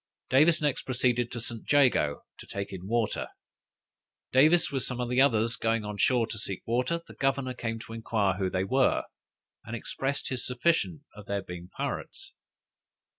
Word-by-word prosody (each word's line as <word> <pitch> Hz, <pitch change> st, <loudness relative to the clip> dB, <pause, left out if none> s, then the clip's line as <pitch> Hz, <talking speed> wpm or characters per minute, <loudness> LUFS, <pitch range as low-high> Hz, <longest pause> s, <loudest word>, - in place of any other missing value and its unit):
Davis 155 Hz, +4 st, +5 dB
next 145 Hz, -3 st, +1 dB
proceeded 120 Hz, -1 st, +1 dB
to 120 Hz, -, -4 dB
St. 115 Hz, -1 st, -6 dB
Jago 125 Hz, -, +3 dB, 0.2 s
to -, -, -11 dB
take 100 Hz, 0 st, -5 dB
in 95 Hz, 0 st, -7 dB
water. 115 Hz, -1 st, 0 dB, 1.0 s
Davis, 155 Hz, +6 st, +5 dB
with 135 Hz, -2 st, -1 dB
some 125 Hz, 0 st, -4 dB
others 125 Hz, -2 st, +3 dB
going 115 Hz, -2 st, 0 dB
on 105 Hz, 0 st, -5 dB
shore 120 Hz, +2 st, +3 dB
to 110 Hz, -1 st, -6 dB
seek 95 Hz, -3 st, -4 dB
water, 125 Hz, +9 st, 0 dB
the -, -, -11 dB
governor 135 Hz, -1 st, 0 dB
came 115 Hz, -2 st, -3 dB
to 115 Hz, 0 st, -9 dB
inquire 110 Hz, -4 st, +1 dB
who 95 Hz, -1 st, +1 dB
they 95 Hz, 0 st, 0 dB
were, 130 Hz, +7 st, +2 dB, 0.6 s
and 115 Hz, 0 st, -5 dB
expressed 135 Hz, +4 st, -3 dB
his 130 Hz, -2 st, -3 dB
suspicion 155 Hz, +4 st, 0 dB
of 105 Hz, -1 st, -11 dB
their 100 Hz, -1 st, -2 dB
being 90 Hz, -1 st, -8 dB
pirates. -, -, -5 dB
120 Hz, 165 wpm, -29 LUFS, 105-135 Hz, 1.0 s, Davis